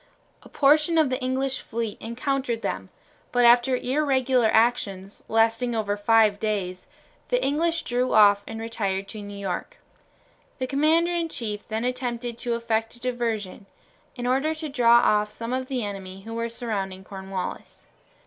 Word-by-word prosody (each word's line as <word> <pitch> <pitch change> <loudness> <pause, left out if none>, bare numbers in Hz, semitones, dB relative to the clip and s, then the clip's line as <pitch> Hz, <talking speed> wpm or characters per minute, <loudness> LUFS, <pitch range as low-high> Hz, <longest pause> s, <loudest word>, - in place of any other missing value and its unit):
A - - -16
portion 305 +3 +3
of 305 -5 +3
the 255 +1 -1
English 260 +1 -1
fleet 225 -3 -4
encountered 245 0 -2
them, 95 0 -3 0.4
but 245 -1 +3
after 240 +2 +5
irregular 260 -3 +2
actions, 205 -4 +1
lasting 225 +2 +2
over 205 -2 0
five 210 0 +3
days, 190 -4 -3 0.4
the - - +1
English 330 +3 +1
drew 250 +1 0
off 205 -1 +6
and 225 0 -6
retired 200 -4 -2
to 215 - -7
New 205 0 -8
York. 195 -2 -4 0.8
The 260 - -2
commander 315 +6 +2
in 335 -1 -1
chief 210 -7 -5
then 220 +1 -2
attempted 245 -2 -3
to 240 -1 -1
effect 225 -1 -1
a - - -14
diversion, 230 -5 -3 0.5
in 245 - -5
order 270 +5 +1
to 310 -1 -5
draw 240 -3 +5
off 210 0 +3
some 230 +3 -5
of 260 0 -2
the 255 -5 -2
enemy 195 -1 -7
who 225 +2 -7
were 230 0 -2
surrounding 200 -5 -4
Cornwallis. 190 -1 -7
235 Hz, 160 wpm, -25 LUFS, 210-260 Hz, 0.8 s, off